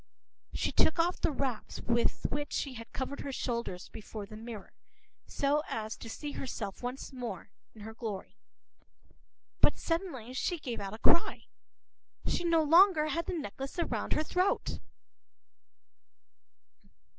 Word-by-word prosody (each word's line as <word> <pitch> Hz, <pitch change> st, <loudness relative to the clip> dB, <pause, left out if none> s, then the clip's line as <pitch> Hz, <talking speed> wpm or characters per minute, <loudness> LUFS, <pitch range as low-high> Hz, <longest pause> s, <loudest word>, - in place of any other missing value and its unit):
p> -, -, -4 dB
She -, -, +1 dB
took 315 Hz, -, +4 dB
off 345 Hz, +2 st, +2 dB
the -, -, +3 dB
wraps 260 Hz, -5 st, -2 dB
with 235 Hz, 0 st, +1 dB
which 290 Hz, +1 st, -2 dB
she 275 Hz, -, -1 dB
had 230 Hz, -1 st, -9 dB
covered 270 Hz, +2 st, -3 dB
her 280 Hz, -, -3 dB
shoulders, 235 Hz, -8 st, -2 dB
before 215 Hz, -1 st, -7 dB
the 215 Hz, +2 st, -10 dB
mirror, 220 Hz, -2 st, -7 dB, 0.6 s
so 290 Hz, +2 st, +2 dB
as 220 Hz, 0 st, -2 dB
to 225 Hz, -, -8 dB
see 290 Hz, +5 st, -4 dB
herself 215 Hz, -8 st, -4 dB
once 250 Hz, +2 st, -4 dB
more 230 Hz, -7 st, -5 dB, 0.2 s
in 215 Hz, -, -11 dB
her 220 Hz, +2 st, -7 dB
glory. 220 Hz, -2 st, -5 dB, 1.2 s
But -, -, +5 dB
suddenly 330 Hz, -, -2 dB
she 350 Hz, +6 st, 0 dB
gave 250 Hz, -7 st, -4 dB
a 200 Hz, +1 st, -4 dB
cry. 335 Hz, +8 st, +4 dB, 0.8 s
She -, -, +1 dB
no 335 Hz, -2 st, +4 dB
longer 325 Hz, 0 st, +7 dB
had 335 Hz, +2 st, -1 dB
the 360 Hz, -, -1 dB
necklace 270 Hz, -, -5 dB
around 340 Hz, -, 0 dB
her 310 Hz, -, +2 dB
throat! 365 Hz, +4 st, +1 dB
260 Hz, 145 wpm, -32 LUFS, 220-310 Hz, 1.2 s, longer